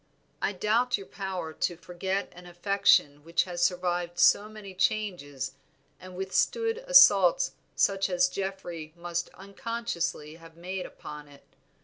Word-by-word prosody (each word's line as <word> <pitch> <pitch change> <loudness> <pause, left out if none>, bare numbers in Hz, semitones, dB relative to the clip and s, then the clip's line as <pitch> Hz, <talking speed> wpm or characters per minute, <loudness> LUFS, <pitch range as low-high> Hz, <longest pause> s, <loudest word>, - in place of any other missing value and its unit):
I - - +1
doubt 225 +5 +1
your 195 - -9
power 185 -6 -5
to 175 +2 -2
forget 185 +3 -4
an 180 0 -12
affection 175 -5 +2
which 165 +2 +1
has 175 -1 -5
survived 175 -1 0
so 205 +3 +5
many 210 -3 -10
changes 175 -10 -1 0.5
and 185 0 -11
withstood 455 - 0
assaults - - +6 0.2
such 195 -1 +2
as 180 0 +3
Geoffrey 180 -5 -5
must 175 0 -3
unconsciously 195 -6 -4
have 165 -1 -16
made 180 +2 -5
upon 150 0 -10
it. 140 -1 -17
180 Hz, 130 wpm, -28 LUFS, 170-200 Hz, 0.5 s, assaults